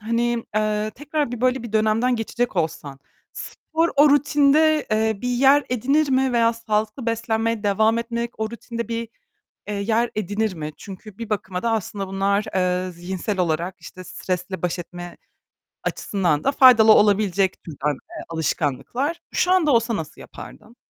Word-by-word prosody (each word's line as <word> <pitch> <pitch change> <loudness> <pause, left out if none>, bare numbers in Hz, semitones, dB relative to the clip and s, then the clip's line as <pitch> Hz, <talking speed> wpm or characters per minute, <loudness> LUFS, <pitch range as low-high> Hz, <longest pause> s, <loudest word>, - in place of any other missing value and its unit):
hani, 235 +1 -1
eee, 215 0 0
tekrar 295 -1 -2
bir 240 - -5
böyle 255 -1 +1
bir 230 -2 -8
dönemden 220 +3 +2
geçecek 230 -1 -2
olsan, 145 -4 -3 0.3
spor 325 +1 -2
o 290 0 +6
rutinde, 295 +2 +3
eee, 220 -1 +1
bir 250 - -1
yer 270 +4 +4
edinir 275 +5 +1
mi 260 -1 +2
veya 230 -1 +3
sağlıklı 220 +2 -2
beslenmeye 230 -1 -1
devam 220 +3 +2
etmek 235 0 -3
o 220 - -1
rutinde 235 -1 -6
bir, 230 -1 -3 0.6
eee, 210 - -3
yer 220 +4 0
edinir 210 0 -1
mi? 155 -1 -5
Çünkü 195 +1 -11
bir 230 -2 -7
bakıma 190 -2 -3
da 230 - +1
aslında 200 -2 -3
bunlar, 200 +2 0
eee, 180 0 0
zihinsel 185 +3 -4
olarak, 175 +1 -1
işte, 185 - -11
stresle 180 0 -4
baş 180 0 -2
etme 175 0 -9 0.7
açısından 175 -7 -1
da 275 - +2
faydalı 240 -5 +7
olabilecek 200 -2 +2
türden, 150 -2 -3
eee, 325 - -10
alışkanlıklar. 165 - -2 0.2
Şu 360 - +2
anda 320 -6 +3
olsa 230 -1 +2
nasıl 155 -1 -7
yapardın? 225 +3 -12
220 Hz, 155 wpm, -22 LUFS, 190-240 Hz, 0.7 s, faydalı